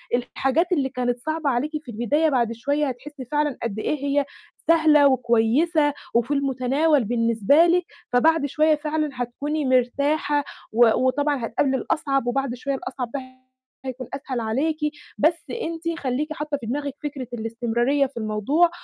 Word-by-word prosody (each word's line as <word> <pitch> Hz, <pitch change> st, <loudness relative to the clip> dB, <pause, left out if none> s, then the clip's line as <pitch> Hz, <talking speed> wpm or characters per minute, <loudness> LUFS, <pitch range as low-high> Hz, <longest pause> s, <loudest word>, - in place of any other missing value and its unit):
الحاجات 270 Hz, +7 st, 0 dB
اللي 275 Hz, -6 st, +1 dB
كانت 245 Hz, -1 st, -2 dB
صعبة 310 Hz, +2 st, -1 dB
عليكِ 265 Hz, +5 st, 0 dB
في 245 Hz, -, -9 dB
البداية 285 Hz, +8 st, +1 dB
بعد 240 Hz, -5 st, +1 dB
شوية 285 Hz, +5 st, 0 dB
هتحسّي 265 Hz, +2 st, -7 dB
فعلًا 295 Hz, +1 st, -1 dB
قد 220 Hz, -2 st, -3 dB
إيه 285 Hz, +4 st, -2 dB
هي 280 Hz, 0 st, +1 dB, 0.4 s
سهلة 315 Hz, -3 st, +6 dB
وكويسة 265 Hz, +5 st, +2 dB, 0.2 s
وفي 235 Hz, +4 st, +2 dB
المتناول 275 Hz, +1 st, +2 dB
بالنسبة 230 Hz, +6 st, +3 dB
لِك، 350 Hz, 0 st, +2 dB, 0.3 s
فبعد 320 Hz, +4 st, +4 dB
شوية 305 Hz, +2 st, +3 dB
فعلًا 305 Hz, 0 st, -2 dB
هتكوني 280 Hz, +5 st, -3 dB
مرتاحة، 280 Hz, +4 st, +1 dB, 0.3 s
و 240 Hz, +2 st, +6 dB, 0.2 s
وطبعًا 285 Hz, -1 st, +1 dB
هتقابلي 265 Hz, +4 st, 0 dB
الأصعب 275 Hz, -4 st, -1 dB
وبعد 270 Hz, 0 st, -1 dB
شوية 275 Hz, +2 st, -3 dB
الأصعب 255 Hz, -3 st, -5 dB
ده 280 Hz, -, -2 dB, 0.6 s
هيكون 255 Hz, -1 st, -5 dB
أسهل 270 Hz, -3 st, -4 dB
عليكِ، 270 Hz, +8 st, 0 dB, 0.4 s
بس 325 Hz, +3 st, +2 dB, 0.2 s
أنتِ 335 Hz, 0 st, -3 dB
خلّيكِ 285 Hz, +4 st, -2 dB
حاطّة 300 Hz, -1 st, -3 dB
في 255 Hz, -, -9 dB
دماغِك 280 Hz, +4 st, -3 dB
فكرة 275 Hz, -4 st, -5 dB
الاستمرارية 240 Hz, +4 st, 0 dB
في 265 Hz, -1 st, -9 dB
الموضوع، 225 Hz, -, +2 dB
275 Hz, 145 wpm, -23 LUFS, 245-300 Hz, 0.6 s, سهلة